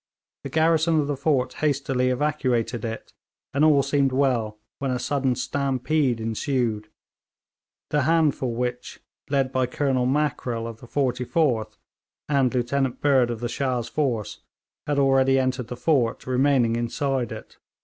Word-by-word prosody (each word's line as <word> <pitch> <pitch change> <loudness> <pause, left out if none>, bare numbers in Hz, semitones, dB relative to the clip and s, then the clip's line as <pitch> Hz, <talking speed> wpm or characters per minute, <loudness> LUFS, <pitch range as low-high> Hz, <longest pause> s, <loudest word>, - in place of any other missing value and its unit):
The 140 - -5
garrison 160 +2 +3
of 150 - +1
the 145 0 -2
fort 130 -3 0
hastily 135 -4 +1
evacuated 125 -4 0
it, 115 -1 -6 0.4
and 140 +2 +2
all 150 -3 +5
seemed 140 0 +1
well, 125 -5 0 0.2
when 135 - -2
a 125 - 0
sudden 135 -1 0
stampede 135 -1 0
ensued 110 -1 -1 1.0
the 150 - +2
handful 145 -5 +1
which, 125 0 -4 0.3
led 135 -2 +1
by 130 -1 +1
Colonel 130 -1 0
Mackrell 130 -5 -1
of 115 -1 -7
the 120 - -13
44th 125 - 0 0.5
and 135 -4 +2
Lieutenant 130 +1 -1
Bird 135 -4 +3
of 120 -1 -4
the 120 - -1
Shah's 125 -2 -2
force, 125 -8 -2 0.5
had 145 -1 0
already 135 -1 +4
entered 130 -2 -1
the 125 - -7
fort, 125 -3 +1
remaining 130 -2 +2
inside 120 +1 -1
it. - - -9
130 Hz, 140 wpm, -24 LUFS, 120-140 Hz, 1.0 s, all